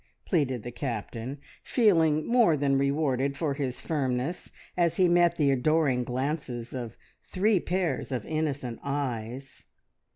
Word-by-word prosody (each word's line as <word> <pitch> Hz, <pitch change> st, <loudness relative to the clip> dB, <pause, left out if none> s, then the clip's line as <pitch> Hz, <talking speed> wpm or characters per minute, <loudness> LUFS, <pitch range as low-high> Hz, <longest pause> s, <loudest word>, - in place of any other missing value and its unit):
pleaded 130 Hz, -6 st, 0 dB
the 120 Hz, -, -6 dB
Captain, 120 Hz, +1 st, -4 dB, 0.2 s
feeling 165 Hz, -, +3 dB
more 235 Hz, -10 st, +4 dB
than 140 Hz, -1 st, +2 dB
rewarded 140 Hz, -1 st, +1 dB
for 150 Hz, -3 st, 0 dB
his 135 Hz, -3 st, -3 dB
firmness 135 Hz, +1 st, -2 dB, 0.3 s
as 170 Hz, -2 st, +2 dB
he 185 Hz, 0 st, +4 dB
met 175 Hz, 0 st, +4 dB
the 145 Hz, -3 st, +3 dB
adoring 135 Hz, -1 st, +2 dB
glances 125 Hz, -1 st, -3 dB
of 120 Hz, -3 st, -6 dB, 0.2 s
three 200 Hz, +1 st, +1 dB
pairs 175 Hz, -7 st, -2 dB
of 125 Hz, -5 st, -3 dB
innocent 145 Hz, -6 st, -2 dB
eyes. 135 Hz, -2 st, -4 dB
140 Hz, 130 wpm, -28 LUFS, 125-160 Hz, 0.3 s, more